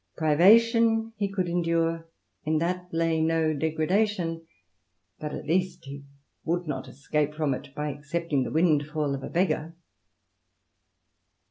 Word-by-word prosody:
Privation 225 +8 +4
he 205 -1 0
could 185 -3 -1
endure: 165 -1 0 0.3
in 155 0 +1
that 180 +2 -2
lay 165 -1 +1
no 160 -1 +2
degradation; 165 +2 0 0.7
but 150 -1 -5
at - - -6
least 175 0 -1
he 140 +1 -8 0.4
would 175 +2 -1
not 135 -4 -4
escape 150 +2 -2
from 150 -3 0
it 130 - -7
by 150 0 -2
accepting 150 +1 -2
the 125 - -2
windfall 155 -2 +1
of 135 - -4
a - - -6
beggar. 170 -2 0
165 Hz, 130 wpm, -27 LUFS, 150-180 Hz, 0.7 s, Privation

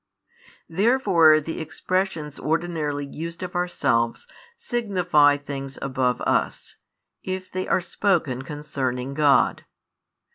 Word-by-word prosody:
Therefore 180 -5 +4
the 160 +2 -5
expressions 160 -1 -2
ordinarily 155 -3 -1
used 165 +5 -7
of 180 - -5
ourselves 140 -10 0 0.3
signify 180 - +2
things 135 -1 -6
above 130 -2 -1
us, - - -1 0.4
if 185 0 -5
they 185 0 -3
are - - +2
spoken 170 -8 0
concerning 135 -3 -4
God. 145 -1 +3
155 Hz, 100 wpm, -24 LUFS, 140-180 Hz, 0.4 s, Therefore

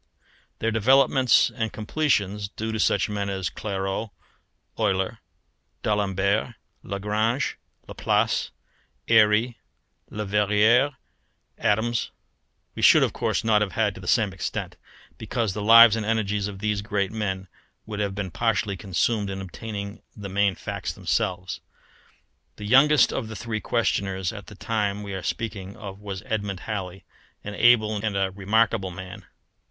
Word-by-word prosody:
Their 115 - -1
developments 130 +3 +4
and 110 -1 -2
completions, 105 -5 -1
due 110 +1 -4
to 110 - -3
such 100 - +2
men 100 -1 -3
as 95 -2 -3
Clairaut, 95 +1 -3 0.7
Euler, 100 0 0 0.6
D'Alembert, 100 +2 0 0.3
Lagrange, 105 +6 -1 0.3
Laplace, - - 0 0.6
Airy, 110 +1 +4 0.5
Leverrier, 105 +6 +2 0.6
Adams, 110 +3 +1 0.6
we - - -6
should - - +7
of - - 0
course - - -1
not 110 -2 +3
have 105 -2 -1
had 105 -3 +1
to 95 - -11
the 90 - -10
same 110 -3 +2
extent; 95 - -4 0.4
because 110 -5 -2
the 105 - -4
lives 115 +1 +8
and 110 - -2
energies 105 -2 0
of 100 -1 -7
these 105 0 -1
great 100 -2 -1
men 95 -4 -3 0.4
would 105 -1 -6
have 100 -2 -1
been 95 -3 -4
partially 110 0 0
consumed 100 +3 -1
in 95 0 -4
obtaining 100 +2 -7 0.2
the 100 -1 -6
main 100 0 +1
facts 100 -3 -5
themselves. 95 0 -2 0.9
The 105 - -8
youngest 140 +6 +5
of 115 - -3
the 110 - -7
three 110 -1 -4
questioners 95 -5 -1
at 100 -2 -9
the 105 - -11
time 105 -1 -2
we 100 -1 -6
are 95 - -4
speaking 100 -2 -4
of 100 -2 -8
was 100 -2 -6
Edmund 100 -6 -3
Halley, 95 -4 -5 0.4
an 105 - -6
able 110 -1 +4
and 100 -3 -1
remarkable 105 0 +1
man. 95 0 -9
105 Hz, 140 wpm, -25 LUFS, 100-110 Hz, 0.9 s, lives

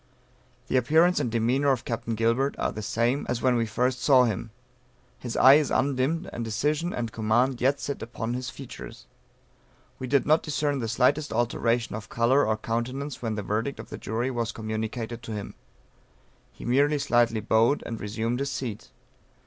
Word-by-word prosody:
"The - - +1
appearance 160 +8 +4
and 120 - -1
demeanor 120 +5 +2
of 130 -3 -1
Captain 115 -1 -3
Gilbert 115 +5 +1
are - - -1
the 110 - -6
same 120 +6 0
as 120 -1 -2
when 130 -1 +3
we 115 -1 +1
first 125 +3 0
saw 130 -3 +6
him; 115 -1 -2 0.7
his 120 -2 -5
eye 135 +2 +8
is 145 - -3
undimmed, 140 +5 0
and 120 - -4
decision 150 +10 -1
and 115 -2 -3
command 120 +4 +1
yet 135 +2 +2
sit 140 +1 -4
upon 115 0 -4
his 125 0 -4
features. 125 - -10 0.9
We 130 - -4
did 140 +1 +2
not 155 +2 +4
discern 145 -2 -1
the 115 - -2
slightest 140 +6 +1
alteration 115 0 0
of 105 -2 -8
color 125 +5 +3
or 110 0 +1
countenance 125 +6 -3
when 115 -3 -2
the 105 - -4
verdict 110 +7 -2
of - - -9
the - - -5
jury 120 +4 -2
was 115 -2 -2
communicated 110 +2 -4
to 115 -2 -7
him; 105 -1 -6 1.0
he - - -11
merely 140 +5 +3
slightly 120 -4 +2
bowed 110 +6 +2
and 115 -1 -5
resumed 115 +4 -2
his 140 0 -1
seat. 120 -6 -5
120 Hz, 180 wpm, -26 LUFS, 115-135 Hz, 1.0 s, eye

